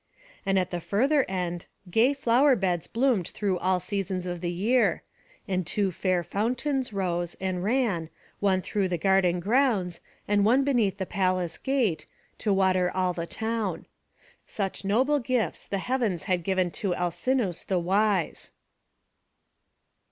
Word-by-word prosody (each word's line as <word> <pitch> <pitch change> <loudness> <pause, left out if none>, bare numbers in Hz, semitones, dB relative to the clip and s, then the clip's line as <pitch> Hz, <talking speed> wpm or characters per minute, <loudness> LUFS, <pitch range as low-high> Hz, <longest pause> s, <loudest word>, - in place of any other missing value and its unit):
And 195 0 +3
at 185 -1 0
the 175 -1 -3
further 260 - +2
end 175 -2 -3 0.2
gay 240 +8 +4
flower 270 +1 +4
beds 180 -6 -1
bloomed 230 -7 +1
through 195 -4 -2
all 185 0 +1
seasons 190 -1 -3
of 175 -1 -4
the 175 - -1
year; 225 +8 +1 0.4
and 185 -2 0
two 195 +3 0
fair 180 0 0
fountains 250 - -1
rose, 175 -3 -2
and 185 -1 -2
ran, 205 -8 0 0.3
one 190 -2 +2
through 200 -2 0
the 180 -1 -1
garden 180 0 +2
grounds, 205 -4 +1 0.3
and 205 0 +3
one 245 +6 +4
beneath 235 -9 +1
the 190 - -2
palace 185 -3 -1
gate, 255 -11 0 0.3
to 215 - 0
water 185 -2 +2
all 185 -1 0
the 170 -1 -4
town. 220 -1 -3 0.6
Such 195 -2 -3
noble 260 +9 +2
gifts 250 -2 -1
the 200 - -2
heavens 220 -5 -1
had 180 -2 0
given 185 -1 0
to 190 -3 -2
Alcinous 180 +3 -1
the 190 - -1
wise. 195 +1 0
195 Hz, 145 wpm, -27 LUFS, 180-230 Hz, 0.6 s, gay